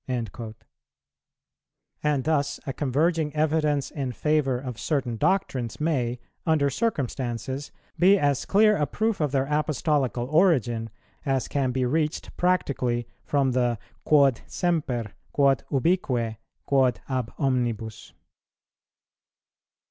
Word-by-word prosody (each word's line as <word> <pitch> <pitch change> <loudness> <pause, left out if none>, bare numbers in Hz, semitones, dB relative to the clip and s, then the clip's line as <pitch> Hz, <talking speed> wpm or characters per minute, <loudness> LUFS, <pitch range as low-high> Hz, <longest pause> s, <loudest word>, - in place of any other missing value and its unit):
"[123:1] 115 -2 -4 1.5
And 150 -3 +1
thus 145 -1 0
a 135 - -3
converging 150 +3 +1
evidence 150 -2 +1
in 135 -4 -3
favour 150 -1 +1
of 125 -3 -6
certain 135 -6 -1
doctrines 130 - 0
may, 125 -6 0 0.2
under 150 -4 +2
circumstances, 130 - -2 0.3
be 190 +4 +6
as 145 -6 +1
clear 210 +1 +5
a 150 - +1
proof 220 -4 -1
of 150 -3 +1
their 135 -1 +1
Apostolical 150 -4 0
origin 130 - +2 0.3
as 135 -2 0
can 140 -2 0
be 130 0 0
reached 155 +4 -1
practically 130 -9 0 0.2
from 140 -2 +1
the 120 -2 +1 0.3
Quod 140 -6 +4
semper, 135 - -1 0.2
quod 135 -3 +3
ubique, 130 -7 +1 0.3
quod 130 -3 +2
ab 130 -4 -2
omnibus. 120 - -1
140 Hz, 110 wpm, -26 LUFS, 125-155 Hz, 1.5 s, be